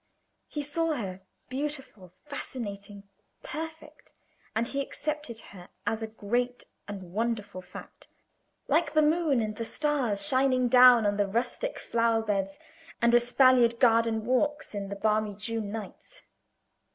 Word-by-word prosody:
He 295 - -4
saw 315 +2 0
her, 190 -7 -5 0.3
beautiful, 265 - -5
fascinating, 205 -7 -6 0.4
perfect, 320 +1 -8 0.4
and 225 +1 +1
he 275 +3 -2
accepted 295 -4 -4
her 180 -2 -12 0.2
as 220 +2 -1
a 220 - -3
great 240 +3 -2 0.2
and 190 -4 -8
wonderful 215 -3 -2
fact, 180 0 -12 0.6
like 315 +2 +1
the 310 - +5
moon 305 -4 +2
and 215 -1 -3
the 230 - -2
stars 260 -4 0
shining 260 -2 +3
down 250 -2 +8
on 205 0 +1
the 205 -1 +2
rustic 245 - -2
flower 230 -1 +1
beds 195 -2 -1 0.4
and 235 0 +3
espaliered 240 0 +5
garden 230 -2 +3
walks 290 +4 0
in 200 -1 -4
the 200 - -4
balmy 215 0 0
June 210 0 -4
nights. 225 - -8
235 Hz, 135 wpm, -28 LUFS, 210-275 Hz, 0.6 s, down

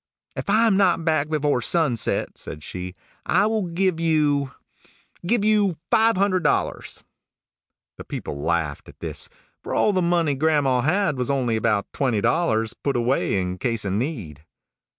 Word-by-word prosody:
"If - - -5
I 220 +3 +4
am 210 -4 +3
not 180 -4 +2
back 155 -2 +1
before 145 -4 +1
sunset," 150 -6 +1
said 75 +1 -8
she, 90 +1 -6 0.3
"I - - +2
will 215 -3 0
give 175 0 0
you 150 -4 +1 0.8
give 220 0 +2
you 205 -5 +2
five 225 -1 +4
hundred 185 -2 +1
dollars." 150 - -1 1.0
The - - -6
people 70 - -6
laughed 80 -2 -2
at - - -16
this; - - -3 0.3
for - - -4
all 210 - +3
the 185 - +1
money 170 -3 +1
grandma 140 -3 +2
had 155 0 +1
was 125 - -1
only 130 -5 0
about 110 -2 0
twenty 125 -6 0
dollars, 110 - +1
put 140 -3 -2
away 120 -4 +1
in 90 0 -3
case 115 -4 -1
of 95 - -1
need. 105 - -4
145 Hz, 160 wpm, -23 LUFS, 115-175 Hz, 1.0 s, I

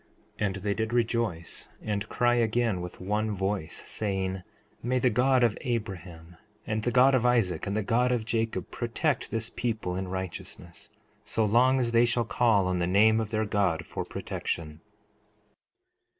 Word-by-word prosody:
4:30 105 - +1
And 95 - -3
they 100 +1 -1
did 110 +2 -2
rejoice 115 -8 -1
and 105 0 -3
cry 120 0 +2
again 115 -4 +1
with 90 0 -8
one 105 +3 -1
voice, 95 -3 -2
saying: 95 -2 -2 0.4
May 125 +2 0
the 125 0 +3
God 125 +2 +3
of 115 -3 +3
Abraham, 90 -8 -5 0.3
and 110 0 -1
the 120 - 0
God 130 +3 +5
of 130 -3 +3
Isaac, 115 -10 +2
and 100 +2 -1
the 110 - 0
God 125 +4 +2
of 120 -3 0
Jacob, 110 -5 -2
protect 120 +4 -1
this 115 0 -3
people 110 -7 -2
in 95 0 -3
righteousness, 90 -2 -6 0.3
so 110 - 0
long 125 +5 +4
as 120 -2 0
they 115 +1 +5
shall 120 0 +1
call 110 -4 +3
on 90 -1 0
the 85 - +1
name 110 +4 +5
of 110 -2 -2
their 110 0 0
God 100 -5 0
for - - -4
protection. 75 -1 -4
110 Hz, 170 wpm, -28 LUFS, 95-120 Hz, 0.4 s, God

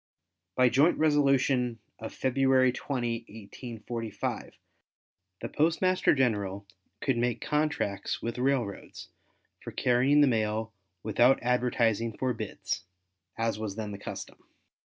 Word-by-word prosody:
By 125 -1 +5
joint 140 +8 +4
resolution 135 -5 +2 0.2
of 110 - -6
February 130 -1 +3
20, 120 -3 -2
1845, 115 +1 -6 0.9
the - - -3
Postmaster 170 +3 +2
General 100 -7 0 0.4
could 135 -4 +1
make 120 0 0
contracts 150 -10 -1
with 115 +1 -4
railroads 125 -6 -2 0.5
for - - -7
carrying 130 +4 +3
the 145 - +6
mail 110 -1 0 0.3
without 120 +5 +4
advertising 115 -3 +1
for 130 -1 0
bids 110 -3 -4 0.5
as 115 -2 -1
was 105 -3 -4
then 105 -2 -4
the 100 - -7
custom. - - -8
120 Hz, 110 wpm, -29 LUFS, 110-135 Hz, 0.9 s, the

